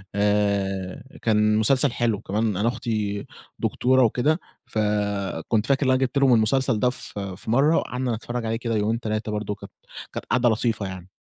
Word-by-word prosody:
آآ 100 Hz, -2 st, 0 dB, 0.2 s
كان 105 Hz, -1 st, +3 dB
مسلسل 130 Hz, +5 st, +4 dB
حلو، 115 Hz, -3 st, 0 dB
وكمان 105 Hz, 0 st, -1 dB
أنا 105 Hz, +4 st, +1 dB
أختي 105 Hz, -4 st, -2 dB, 0.3 s
دكتورة 130 Hz, +1 st, +2 dB
وكده، 135 Hz, +8 st, +2 dB, 0.3 s
فكنت 105 Hz, -1 st, -1 dB
فاكر 140 Hz, +2 st, +2 dB
إن -, -, +2 dB
أنا 130 Hz, -, +3 dB
جِبت 135 Hz, +2 st, 0 dB
لهم 135 Hz, -2 st, +5 dB
المسلسل 115 Hz, +1 st, +2 dB
ده 125 Hz, -, +3 dB
ف 125 Hz, -4 st, -6 dB
في 100 Hz, +2 st, -5 dB
مرة 145 Hz, +7 st, +4 dB
وقعدنا 125 Hz, -2 st, -1 dB
نتفرج 120 Hz, +1 st, -5 dB
عليه 110 Hz, -, -1 dB
كده 115 Hz, 0 st, -2 dB
يومين 110 Hz, +2 st, 0 dB
3 110 Hz, -1 st, -3 dB
برضه 105 Hz, -1 st, -3 dB
كانت 100 Hz, -, -12 dB, 0.4 s
كانت -, -, -5 dB
قاعدة 120 Hz, 0 st, +2 dB
لطيفة 110 Hz, -2 st, 0 dB
يعني. 95 Hz, -1 st, -8 dB
110 Hz, 170 wpm, -24 LUFS, 105-125 Hz, 0.4 s, لهم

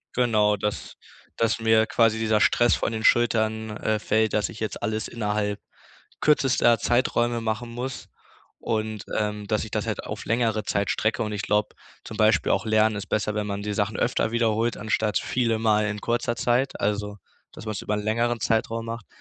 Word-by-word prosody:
Genau, 110 Hz, -4 st, +3 dB
dass 105 Hz, +1 st, -4 dB, 0.4 s
dass 115 Hz, 0 st, +1 dB
mir 110 Hz, -1 st, +3 dB
quasi 115 Hz, 0 st, +2 dB
dieser 110 Hz, -1 st, +2 dB
Stress 120 Hz, +2 st, +4 dB
von -, -, -2 dB
den 110 Hz, -1 st, -4 dB
Schultern, 110 Hz, -2 st, +2 dB
äh, 110 Hz, 0 st, 0 dB
fällt, 110 Hz, 0 st, +1 dB
dass 105 Hz, -, +1 dB
ich 110 Hz, -, -10 dB
jetzt 110 Hz, -2 st, -4 dB
alles 110 Hz, +1 st, -2 dB
innerhalb 105 Hz, -2 st, -2 dB, 0.6 s
kürzester 130 Hz, -5 st, +3 dB
Zeiträume 120 Hz, 0 st, +1 dB
machen 115 Hz, +1 st, -3 dB
muss 125 Hz, +2 st, -5 dB, 0.5 s
und, 110 Hz, -1 st, -2 dB, 0.2 s
ähm, 105 Hz, -1 st, -3 dB
dass 105 Hz, -1 st, 0 dB
ich 110 Hz, -, -11 dB
das -, -, -2 dB
halt -, -, -3 dB
auf -, -, -6 dB
längere 115 Hz, -2 st, +1 dB
Zeit 100 Hz, 0 st, -1 dB
strecke. 110 Hz, +1 st, 0 dB
Und 105 Hz, -, -4 dB
ich 105 Hz, -1 st, -3 dB
glaub, 105 Hz, 0 st, 0 dB, 0.3 s
zum 110 Hz, -, -8 dB
Beispiel 110 Hz, -3 st, +3 dB
auch 95 Hz, -, 0 dB
Lernen 110 Hz, 0 st, +3 dB
ist 100 Hz, -1 st, -6 dB
besser, 105 Hz, 0 st, -1 dB
wenn 105 Hz, -1 st, -2 dB
man 100 Hz, 0 st, -3 dB
die 105 Hz, 0 st, -3 dB
Sachen 100 Hz, 0 st, -1 dB
öfter 110 Hz, -, 0 dB
wiederholt, 115 Hz, 0 st, +1 dB
anstatt 105 Hz, 0 st, 0 dB
viele 115 Hz, -3 st, 0 dB
Male 105 Hz, -1 st, +2 dB
in 105 Hz, 0 st, -5 dB
kurzer 120 Hz, +1 st, -1 dB
Zeit, 125 Hz, +3 st, 0 dB
also 105 Hz, 0 st, -1 dB, 0.3 s
dass -, -, -11 dB
man's 110 Hz, -2 st, -4 dB
über 105 Hz, -, -1 dB
'n 105 Hz, -, -1 dB
längeren 115 Hz, +2 st, 0 dB
Zeitraum 115 Hz, 0 st, -1 dB
macht. 115 Hz, -2 st, -6 dB
110 Hz, 185 wpm, -25 LUFS, 105-115 Hz, 0.6 s, Stress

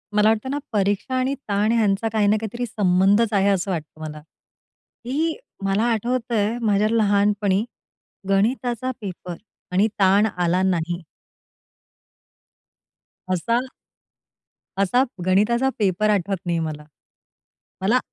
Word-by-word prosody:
मला 210 Hz, +1 st, +5 dB
वाटतं 220 Hz, +3 st, 0 dB
ना 285 Hz, -, -1 dB, 0.2 s
परीक्षा 205 Hz, +5 st, 0 dB
आणि 255 Hz, +1 st, +1 dB, 0.2 s
ताण 205 Hz, +2 st, +2 dB
ह्यांचा 220 Hz, -1 st, +2 dB
काही 215 Hz, -2 st, +2 dB
ना 215 Hz, +1 st, +4 dB
काहीतरी 235 Hz, +3 st, -3 dB
संबंधच 200 Hz, +1 st, +2 dB
आहे, 200 Hz, -1 st, +3 dB
असं 195 Hz, 0 st, 0 dB
वाटतं 155 Hz, -2 st, -6 dB
मला. 150 Hz, -1 st, -7 dB, 0.8 s
की 310 Hz, +6 st, -1 dB, 0.3 s
मला 195 Hz, +2 st, +1 dB
आठवतंय 230 Hz, -1 st, 0 dB
माझ्या 210 Hz, -1 st, +2 dB
लहानपणी 205 Hz, -2 st, +2 dB, 0.7 s
गणिताचा 240 Hz, +4 st, 0 dB
पेपर 180 Hz, -3 st, -6 dB, 0.4 s
आणि 190 Hz, +4 st, +3 dB
ताण 195 Hz, +2 st, +5 dB
आला 175 Hz, +1 st, +1 dB
नाही 175 Hz, -1 st, 0 dB, 2.3 s
असा 185 Hz, +6 st, 0 dB, 1.2 s
असा 220 Hz, +7 st, +3 dB, 0.2 s
गणिताचा 230 Hz, +8 st, +3 dB
पेपर 205 Hz, +1 st, +1 dB
आठवत 200 Hz, -1 st, +1 dB
नाही 170 Hz, -1 st, 0 dB
मला. 155 Hz, -2 st, -4 dB, 1.0 s
मला 225 Hz, +7 st, +3 dB
205 Hz, 115 wpm, -22 LUFS, 190-230 Hz, 2.3 s, मला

